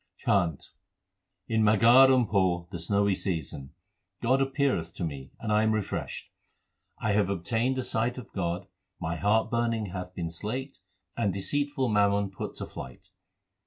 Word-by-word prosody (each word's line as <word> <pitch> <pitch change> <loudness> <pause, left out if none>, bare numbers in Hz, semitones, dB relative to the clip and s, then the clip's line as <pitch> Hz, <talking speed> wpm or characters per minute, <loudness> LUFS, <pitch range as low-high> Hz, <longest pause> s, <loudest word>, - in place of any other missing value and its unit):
CHHANT 90 -7 +1 0.8
In 110 -1 +1
Maghar 115 +5 +7
and 125 -3 +3
Poh, 90 -4 +1
the 85 - -5
snowy 100 +4 +2
season, 75 -7 -3 0.5
God 130 +3 +2
appeareth 135 - 0
to 90 - -4
me 70 -4 -5
and 110 - -3
I 105 - +4
am 110 0 +2
refreshed. 110 -2 -4 0.7
I 110 - -1
have 100 -2 +2
obtained 115 +8 0
a 130 - -1
sight 120 +2 -1
of 125 - -10
God, 90 -1 -2 0.3
my 85 +2 -3
heart 110 +2 +2
burning 115 -4 0
hath 90 -1 -6
been 85 -2 -3
slaked, 120 - -5 0.4
and 110 -4 +1
deceitful 140 +7 0
mammon 100 -1 +2
put 95 - -6
to - - -5
flight. 65 -1 -10
105 Hz, 155 wpm, -28 LUFS, 90-115 Hz, 0.8 s, Maghar